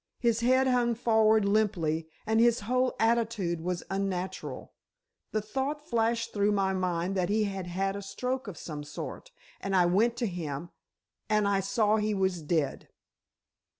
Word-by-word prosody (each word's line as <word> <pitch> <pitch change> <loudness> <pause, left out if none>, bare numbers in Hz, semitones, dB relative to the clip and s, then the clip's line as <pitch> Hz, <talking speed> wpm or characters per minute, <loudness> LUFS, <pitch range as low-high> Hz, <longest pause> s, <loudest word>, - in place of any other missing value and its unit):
His 235 -2 +1
head 255 +2 +4
hung 245 -2 +2
forward 220 -2 +3
limply, 175 -7 +1 0.2
and 220 +1 +2
his 235 -1 +4
whole 255 +4 +1
attitude 225 -7 +1
was 180 +1 -2
unnatural. 190 -1 -3 0.6
The 215 -1 -1
thought 275 +7 -3
flashed 230 -1 0
through 205 0 +2
my 195 -1 +1
mind 180 -1 -1
that 185 -1 0
he 215 +1 +2
had 195 -3 -3
had 195 +2 -1
a 200 - -5
stroke 250 +5 -3
of 190 -5 -7
some 150 -3 -6
sort, 150 - -7 0.3
and 195 -1 -2
I 180 -2 +5
went 220 +7 +2
to 240 - 0
him—and 175 +5 -4
I 200 -1 +2
saw 210 +2 +2
he 210 0 0
was 190 -3 0
dead." 150 -2 -1
205 Hz, 155 wpm, -29 LUFS, 180-230 Hz, 0.6 s, I